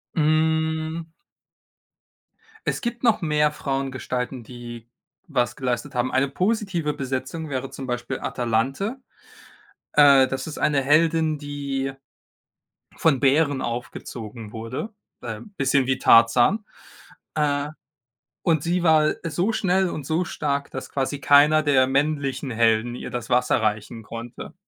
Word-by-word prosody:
Hm. 160 Hz, +1 st, +1 dB, 1.6 s
Es -, -, -1 dB
gibt 235 Hz, -1 st, -4 dB
noch 225 Hz, -3 st, +3 dB
mehr 150 Hz, -2 st, +2 dB
Frauengestalten, 130 Hz, -3 st, -3 dB
die 120 Hz, -1 st, -10 dB, 0.4 s
was 125 Hz, -7 st, 0 dB
geleistet 130 Hz, +1 st, -3 dB
haben. 125 Hz, +1 st, 0 dB
Eine 130 Hz, +1 st, +2 dB
positive 185 Hz, -, -1 dB
Besetzung 135 Hz, +3 st, -4 dB
wäre 135 Hz, -1 st, -3 dB
zum 135 Hz, -1 st, -8 dB
Beispiel 125 Hz, +2 st, -3 dB
Atalante. 130 Hz, -, -1 dB, 1.0 s
Äh, 140 Hz, -3 st, +7 dB
das 135 Hz, +2 st, -4 dB
ist 155 Hz, -, -6 dB
eine 145 Hz, -2 st, +2 dB
Heldin, 155 Hz, +2 st, +3 dB
die 140 Hz, -2 st, -4 dB, 1.0 s
von 145 Hz, -6 st, +2 dB
Bären 140 Hz, 0 st, +3 dB
aufgezogen 115 Hz, -2 st, -6 dB
wurde, 120 Hz, -, -5 dB, 0.3 s
b -, -, -10 dB
ähm, 115 Hz, -, -8 dB
bisschen 135 Hz, -1 st, +2 dB
wie 130 Hz, -1 st, 0 dB
Tarzan. 120 Hz, -, +5 dB, 0.7 s
Äh, 145 Hz, -1 st, 0 dB, 0.8 s
und 160 Hz, -5 st, +2 dB
sie 175 Hz, +1 st, 0 dB
war 155 Hz, -2 st, +4 dB
so 175 Hz, +6 st, 0 dB
schnell 190 Hz, -2 st, +1 dB
und 150 Hz, -5 st, -5 dB
so 160 Hz, +4 st, 0 dB
stark, 140 Hz, -3 st, -2 dB
dass 130 Hz, -, -6 dB
quasi 140 Hz, +1 st, -2 dB
keiner 150 Hz, +2 st, +5 dB
der 135 Hz, -3 st, +4 dB
männlichen 140 Hz, -1 st, 0 dB
Helden 115 Hz, +1 st, +2 dB
ihr -, -, -6 dB
das 120 Hz, 0 st, -5 dB
Wasser 125 Hz, -1 st, +2 dB
reichen 110 Hz, +1 st, -2 dB
konnte. 115 Hz, +2 st, -8 dB
140 Hz, 125 wpm, -24 LUFS, 125-155 Hz, 1.6 s, Äh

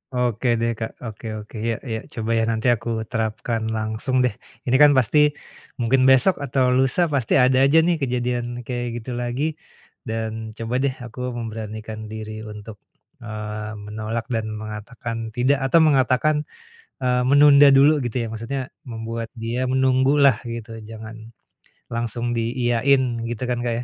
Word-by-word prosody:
Oke 125 Hz, -1 st, 0 dB
deh 115 Hz, 0 st, +1 dB
Kak, 110 Hz, -1 st, -3 dB
oke 115 Hz, 0 st, -8 dB, 0.2 s
oke, 110 Hz, -, -16 dB
iya 115 Hz, -1 st, 0 dB
iya, 110 Hz, -1 st, -2 dB
coba 115 Hz, 0 st, -3 dB
ya -, -, +2 dB
nanti 110 Hz, +2 st, -1 dB
aku 115 Hz, +1 st, -10 dB, 0.2 s
terapkan 110 Hz, 0 st, -2 dB
langsung 110 Hz, +4 st, -2 dB
deh. 125 Hz, -, +2 dB, 0.3 s
Ini 125 Hz, -, +2 dB
kan 145 Hz, -, +8 dB
pasti 130 Hz, +4 st, +3 dB, 0.6 s
mungkin 125 Hz, +2 st, +2 dB
besok 135 Hz, +8 st, +5 dB
atau 130 Hz, -2 st, +1 dB
lusa 135 Hz, +6 st, +2 dB
pasti 130 Hz, -5 st, +1 dB
ada 130 Hz, 0 st, +4 dB
aja 150 Hz, +4 st, +4 dB
nih 175 Hz, +1 st, +2 dB
kejadian 125 Hz, -2 st, -1 dB, 0.2 s
kayak 120 Hz, 0 st, -3 dB, 0.2 s
gitu 125 Hz, -, -6 dB
lagi, 120 Hz, +3 st, -2 dB, 0.6 s
dan 110 Hz, -1 st, -4 dB
coba 115 Hz, +2 st, -4 dB
deh 135 Hz, -2 st, 0 dB
aku 120 Hz, +1 st, -11 dB, 0.2 s
memberanikan 110 Hz, -1 st, -6 dB
diri 110 Hz, 0 st, -6 dB
untuk, 105 Hz, 0 st, -10 dB, 0.4 s
eee, 105 Hz, -1 st, -6 dB
menolak 110 Hz, +2 st, -4 dB
dan 115 Hz, -2 st, -1 dB, 0.2 s
mengatakan 110 Hz, +2 st, -6 dB, 0.2 s
tidak, 130 Hz, +3 st, +2 dB
atau 150 Hz, +6 st, +5 dB
mengatakan, 140 Hz, +1 st, +3 dB, 0.7 s
eee, 125 Hz, 0 st, +2 dB
menunda 145 Hz, +1 st, +7 dB
dulu 145 Hz, +2 st, +5 dB
gitu 120 Hz, -4 st, -4 dB
ya, -, -, -3 dB
maksudnya 115 Hz, +5 st, -4 dB, 0.3 s
membuat 115 Hz, 0 st, -5 dB
dia 120 Hz, +3 st, -2 dB
menunggu 130 Hz, +1 st, +3 dB
lah 130 Hz, -5 st, +5 dB
gitu 115 Hz, -1 st, -6 dB
jangan 110 Hz, 0 st, -9 dB, 0.7 s
langsung 120 Hz, +1 st, -2 dB
diiyain, 120 Hz, +3 st, +2 dB, 0.3 s
gitu 120 Hz, +1 st, -4 dB
kan 120 Hz, -1 st, -1 dB
Kak 120 Hz, -1 st, 0 dB
ya. -, -, -4 dB
120 Hz, 155 wpm, -22 LUFS, 110-130 Hz, 0.7 s, kan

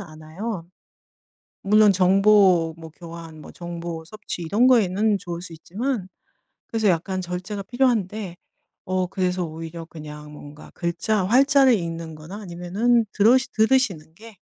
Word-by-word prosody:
않아요. 165 Hz, +3 st, -7 dB, 1.0 s
물론 210 Hz, +1 st, +5 dB
정보 190 Hz, -3 st, +4 dB
뭐 160 Hz, -1 st, -10 dB
교환, 165 Hz, -2 st, -10 dB
뭐 -, -, -11 dB
정보 170 Hz, -1 st, -6 dB
섭취 210 Hz, -2 st, -7 dB
이런 210 Hz, +10 st, +2 dB
거에는 210 Hz, -3 st, +3 dB
좋을 170 Hz, -1 st, -6 dB
수 175 Hz, -2 st, -10 dB
있지만 205 Hz, -, -4 dB, 0.6 s
그래서 220 Hz, -2 st, 0 dB
약간 185 Hz, +2 st, 0 dB
절제가 185 Hz, +3 st, -5 dB
필요한데 215 Hz, -7 st, -1 dB, 0.5 s
어 185 Hz, 0 st, -1 dB
그래서 180 Hz, -1 st, -1 dB
오히려 165 Hz, +1 st, -7 dB
그냥 150 Hz, -2 st, -10 dB
뭔가 150 Hz, 0 st, -12 dB
글자 180 Hz, +4 st, -1 dB
활자를 270 Hz, +4 st, +5 dB
읽는 165 Hz, -4 st, -3 dB
거나 160 Hz, +7 st, -9 dB
아니면은 200 Hz, +6 st, 0 dB
들으시 240 Hz, +4 st, +3 dB
들으시는 220 Hz, -9 st, +1 dB
게 220 Hz, -1 st, -14 dB
185 Hz, 290 characters per minute, -23 LUFS, 165-215 Hz, 1.0 s, 물론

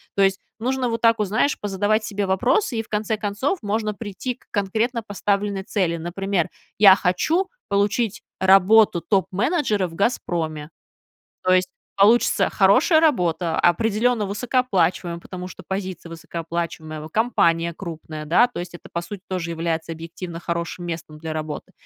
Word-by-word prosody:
То 200 Hz, -, +2 dB
есть 195 Hz, 0 st, +2 dB, 0.2 s
нужно 255 Hz, +2 st, 0 dB
вот 230 Hz, 0 st, -2 dB
так 230 Hz, -1 st, +4 dB
от, 210 Hz, -, +1 dB
знаешь, 220 Hz, +9 st, +1 dB
позадавать 205 Hz, +2 st, 0 dB
себе 205 Hz, -2 st, -2 dB
вопросы, 240 Hz, -, +1 dB
и -, -, -1 dB
в -, -, -21 dB
конце 215 Hz, +1 st, -1 dB
концов 215 Hz, -, -1 dB
можно 215 Hz, 0 st, -1 dB
прийти 225 Hz, +4 st, -5 dB
к -, -, -29 dB
конкретно 225 Hz, +4 st, -1 dB
поставленной 200 Hz, -1 st, -1 dB
цели. 185 Hz, -4 st, 0 dB
Например: 175 Hz, +1 st, -1 dB, 0.3 s
"Я 195 Hz, -2 st, +9 dB
хочу 315 Hz, -, +1 dB, 0.2 s
получить 205 Hz, +1 st, 0 dB, 0.2 s
работу 195 Hz, 0 st, +5 dB
топ-менеджера 200 Hz, -, +1 dB
в 165 Hz, -, -12 dB
'Газпроме'". 165 Hz, -7 st, -1 dB, 0.7 s
То 185 Hz, -, +3 dB
есть 185 Hz, 0 st, +3 dB, 0.3 s
получится 215 Hz, +5 st, +4 dB
хорошая 320 Hz, -4 st, +4 dB
работа, 175 Hz, -, +1 dB
определенно 225 Hz, +4 st, +2 dB
высокооплачиваемая, 195 Hz, -6 st, 0 dB
потому 180 Hz, 0 st, -7 dB
что -, -, -11 dB
позиция 190 Hz, -3 st, -5 dB
высокооплачиваемая, 165 Hz, -2 st, -5 dB
компания 170 Hz, -5 st, +1 dB
крупная, 155 Hz, -3 st, -7 dB
да, 180 Hz, +11 st, +5 dB
то 245 Hz, -, -7 dB
есть 175 Hz, 0 st, -6 dB
это, 175 Hz, -, -12 dB
по 170 Hz, -, -2 dB
сути, 185 Hz, +3 st, -8 dB
тоже 180 Hz, -3 st, -3 dB
является 165 Hz, 0 st, -2 dB
объективно 165 Hz, +1 st, -8 dB
хорошим 170 Hz, +1 st, -3 dB
местом 160 Hz, -2 st, -6 dB
для 160 Hz, 0 st, -5 dB
работы. 155 Hz, -1 st, -5 dB
195 Hz, 150 wpm, -22 LUFS, 170-220 Hz, 0.7 s, Я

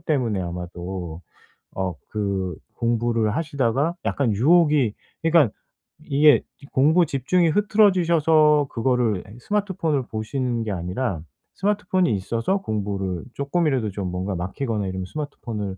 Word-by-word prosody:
때문에 125 Hz, -11 st, 0 dB
아마도 90 Hz, 0 st, -6 dB, 0.5 s
어 95 Hz, -2 st, -2 dB
그 100 Hz, -4 st, -2 dB, 0.2 s
공부를 115 Hz, -2 st, 0 dB
하시다가 140 Hz, 0 st, 0 dB
약간 135 Hz, -5 st, +1 dB
유혹이 150 Hz, -, +4 dB, 0.3 s
그러니까 165 Hz, -8 st, +4 dB, 0.5 s
이게 145 Hz, +1 st, +5 dB, 0.3 s
공부 155 Hz, +6 st, +4 dB
집중이 160 Hz, +5 st, +1 dB
흐트러지셔서 165 Hz, -7 st, +4 dB
그거를 115 Hz, -5 st, +1 dB
에이 105 Hz, -, -12 dB
스마트폰을 170 Hz, -, -1 dB
보시는 120 Hz, +2 st, -2 dB
게 110 Hz, -, -3 dB
아니라 90 Hz, +1 st, -2 dB, 0.3 s
스마트폰이 190 Hz, -, +1 dB
있어서 115 Hz, -, -1 dB
공부를 100 Hz, -, -3 dB
쪼끔이라도 140 Hz, -, 0 dB
좀 95 Hz, -1 st, -4 dB
뭔가 95 Hz, +2 st, -3 dB
막히거나 105 Hz, +4 st, -3 dB
이러면 95 Hz, 0 st, -4 dB
스마트폰을 110 Hz, -8 st, -5 dB
120 Hz, 325 characters per minute, -23 LUFS, 100-155 Hz, 0.5 s, 이게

